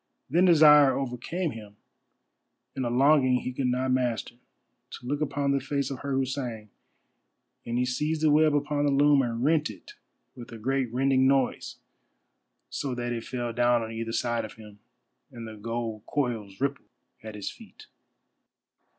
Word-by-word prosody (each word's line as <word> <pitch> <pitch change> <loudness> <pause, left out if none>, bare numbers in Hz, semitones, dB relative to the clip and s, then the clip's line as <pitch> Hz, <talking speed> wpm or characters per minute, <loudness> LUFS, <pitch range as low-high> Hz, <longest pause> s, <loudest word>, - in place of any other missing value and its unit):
Then 175 +5 +4
desire 150 -5 +7
overcame 140 +7 -3
him, 105 -3 -11 1.0
and 130 -3 -2
a - - -1
longing 130 0 +4
he 125 - -5
could 130 0 -1
not 130 +1 0
master, 125 -3 -1 0.6
to - - -9
look 145 +4 -2
upon 140 -1 0
the 140 - +2
face 140 0 -2
of 135 - -5
her 140 -1 -4
who 135 0 +1
sang, 120 -6 -5 1.0
and 120 +1 -2
he 125 - +1
seized 150 +5 -1
the 155 - +4
web 155 0 +4
upon 145 0 0
the - - +2
loom, 145 0 +4
and 120 -1 -2
rent 150 -1 +2
it 100 -5 -12 0.4
with 120 -2 -11
a 115 - -8
great 130 +1 -1
rending 130 +1 +2
noise, 135 -1 0 0.9
so 135 -3 -4
that 120 0 -3
it 115 -1 -5
fell 120 -1 -4
down 120 0 +2
on 110 - -6
either 115 0 -4
side 120 0 -1
of 110 - -8
him, 105 -2 -14 0.5
and 120 -3 -8
the 110 - -8
gold 115 0 -5
coils 115 -8 -3
rippled 140 +1 -3 0.3
at 110 -1 -9
his 105 - -5
feet. 235 - -15
130 Hz, 170 wpm, -27 LUFS, 115-140 Hz, 1.0 s, desire